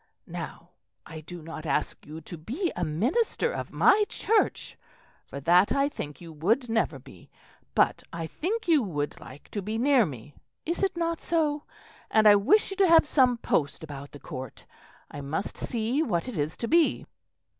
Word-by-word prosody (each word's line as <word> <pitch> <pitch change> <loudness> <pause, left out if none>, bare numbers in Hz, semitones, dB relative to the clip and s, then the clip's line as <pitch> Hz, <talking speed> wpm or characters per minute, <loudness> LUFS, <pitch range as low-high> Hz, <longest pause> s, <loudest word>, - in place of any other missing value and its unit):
Now - - -7 0.4
I 160 -1 -9
do 165 +2 -10
not 160 -1 -7
ask 140 - -2
you 155 +2 -8
to 165 - -9
be 255 - -3
a 180 - -2
minister 255 - 0
of - - -5
my 420 +1 +5
Church, 440 0 0 0.5
for 140 - -7
that, 175 +6 +4
I 275 0 +3
think, 150 - -7
you 170 -2 -10
would 220 - +1
never 220 -10 0
be; 130 - -16 0.5
but - - +3
I 165 -1 -4
think 410 - -3
you 320 -4 +5
would 150 -9 -3
like 135 +3 -13
to 205 - -4
be 215 +3 -3
near 255 -3 +4
me 140 0 -9 0.3
is 335 +2 -2
it 385 -3 0
not 335 -1 -1
so? 300 -3 0 0.4
And 220 -1 +5
I 205 - +9
wish 305 - +3
you 390 - -5
to 390 -2 +5
have 330 -2 +7
some 255 -5 +3
post 150 -9 -1
about 145 -2 -8
the 145 - -11
Court; 130 -2 -8 0.5
I 145 - -7
must 155 +8 -3
see 235 +5 -1
what 180 - -1
it 250 - -5
is 150 0 -2
to 230 - -3
be." 335 +3 +3
215 Hz, 185 wpm, -27 LUFS, -, 0.5 s, I